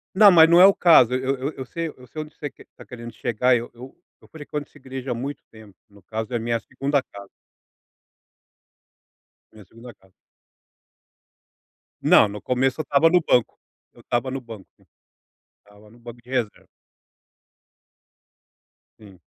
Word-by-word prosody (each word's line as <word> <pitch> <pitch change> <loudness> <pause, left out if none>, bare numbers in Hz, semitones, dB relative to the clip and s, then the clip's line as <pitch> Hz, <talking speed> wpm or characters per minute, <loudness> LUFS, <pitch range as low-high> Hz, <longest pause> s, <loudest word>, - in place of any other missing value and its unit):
Não 205 0 +8
mas 165 -2 +7
não 170 +1 +6
é 185 - +9
o 195 - +6
caso, 145 -9 +5
eu 130 +1 -1
eu 135 +4 -4
eu 130 - -8
sei 165 +5 -5
eu 125 -3 -15
sei 155 - -7
onde 155 0 -11
você 145 - -6
quer 135 - -19
tá - - -13
querendo 120 -1 -10
chegar 120 +3 +1
eu 120 0 -4
eu 125 +3 -13 0.3
eu - - -20
frequento 150 -1 -7
essa - - -20
igreja 130 -1 -7
há - - 0
muito 135 +5 -6
tempo, 110 -3 -16
no 100 0 -21
caso 110 +5 -6
é 120 - 0
minha 115 +1 -2
2ª 135 +4 -2
casa. 100 -5 -13 2.2
Minha 110 -2 -16
2ª 115 +5 -14
casa. 95 -1 -28 1.9
Não, 110 - +5
no 105 0 -8
começo 130 +6 -1
eu - - -1
estava 145 +3 +3
no 180 +2 +4
banco, 125 -7 0 0.3
eu - - -21
estava 120 +2 -2
no 135 - -4
banco, 115 -6 -12 0.9
estava 105 +1 -21
no 115 - -20
banco 120 0 -12
de 125 - -18
reserva. 125 -5 -3 2.3
Sim. 100 -4 -16
125 Hz, 165 wpm, -22 LUFS, 115-140 Hz, 2.3 s, é